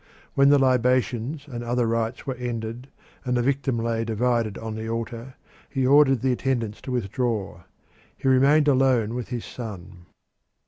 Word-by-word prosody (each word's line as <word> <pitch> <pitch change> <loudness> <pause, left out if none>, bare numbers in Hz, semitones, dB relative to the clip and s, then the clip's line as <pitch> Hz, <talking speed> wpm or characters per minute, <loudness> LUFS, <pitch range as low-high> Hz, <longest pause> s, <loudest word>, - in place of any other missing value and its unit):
When 140 0 +5
the 145 - +6
libations 130 +2 +1
and 120 -4 -6
other 120 0 0
rites 115 +1 -2
were 135 - -2
ended 120 0 -5 0.4
and 125 -2 0
the 120 - +1
victim 135 -1 0
lay 115 0 -1
divided 115 -1 0
on 110 -1 -5
the 110 +1 -5
altar, 115 +2 -5 0.3
he 135 -2 -1
ordered 135 -2 +5
the 130 - +2
attendants 120 -4 -2
to 130 - -6
withdraw. 115 -5 -2 0.6
He - - -3
remained 140 +3 +4
alone 130 -5 +3
with 125 -1 -4
his 120 -2 -5
son. 95 -6 -9
120 Hz, 155 wpm, -24 LUFS, 115-130 Hz, 0.6 s, the